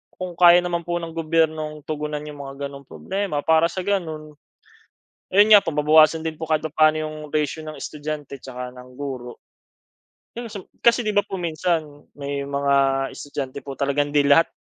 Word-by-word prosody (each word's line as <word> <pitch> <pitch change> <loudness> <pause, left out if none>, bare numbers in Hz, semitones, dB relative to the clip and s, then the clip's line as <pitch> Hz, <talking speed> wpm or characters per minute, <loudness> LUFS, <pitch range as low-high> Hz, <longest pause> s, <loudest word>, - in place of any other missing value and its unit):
kung 185 -1 -5
kaya 175 0 +8
naman 175 -1 -2
po 175 - -1
ng 165 -1 -5
gobyernong 155 -2 0
tugunan 150 -1 -3
'yong 150 -1 -9
mga 135 0 -8
gano'ng 140 -1 -12
problema 190 -6 -3
para 160 +1 +4
sa 185 +2 -4
gano'n, 160 -6 -2 1.0
ayon 205 +2 +6
nga 205 - +10
po, - - -5
mababawasan 155 +2 +5
din 160 -1 -3
po 160 - -4
kahit 155 0 +1
papa'no 155 0 +3
'yong 155 0 -7 0.2
ratio 150 +1 0
ng 155 - -7
estudyante 150 -2 -6
tsaka 125 -1 -7
ng 125 0 -13
guro. 130 -4 -6 1.0
Hmm, 235 0 -5 0.4
kasi 235 +1 +4
'di - - +2
ba 205 - +4
po 195 - -5
minsan, 170 -1 0 0.4
may 140 0 -3
mga 140 0 0 0.4
estudyante 140 -1 -5
po 140 -1 -7
talagang 145 +1 0
hindi 145 -1 +4
lahat 165 +4 +6
155 Hz, 175 wpm, -23 LUFS, 145-165 Hz, 1.0 s, nga